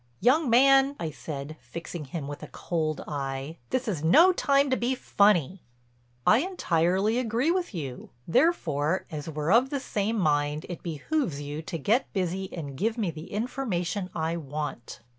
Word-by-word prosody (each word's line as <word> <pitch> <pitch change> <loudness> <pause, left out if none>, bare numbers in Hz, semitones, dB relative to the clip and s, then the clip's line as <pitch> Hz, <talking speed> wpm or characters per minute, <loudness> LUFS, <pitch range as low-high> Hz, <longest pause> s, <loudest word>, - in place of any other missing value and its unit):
"Young 260 - +3
man," 270 +3 +5
I 160 - -3
said, 150 +1 -7
fixing 160 +5 -7
him 140 +1 -5
with 145 0 -7
a - - -7
cold 155 -3 -2
eye, 140 +1 -4
"this 260 0 -1
is 175 -8 -2
no 330 - +7
time 280 -4 +2
to - - +4
be 255 +1 0
funny." 195 - +2 0.6
"I 220 - +6
entirely 200 - +1
agree 245 +6 +1
with 360 0 -1
you. 135 -7 -6 0.2
Therefore 165 - +2
as 150 0 -5
we're 155 +2 -2
of 245 +5 +5
the 280 - -2
same 220 -3 -1
mind 150 -4 +1
it 175 - -6
behooves 170 - -2
you 145 +1 -5
to 165 +1 -5
get 220 - +1
busy 190 0 -2
and 145 -5 -6
give 220 - -1
me 205 -7 0
the 160 +1 -10
information 205 -5 -2
I 165 +1 -1
want." 145 -6 -6
175 Hz, 165 wpm, -27 LUFS, 155-240 Hz, 0.6 s, no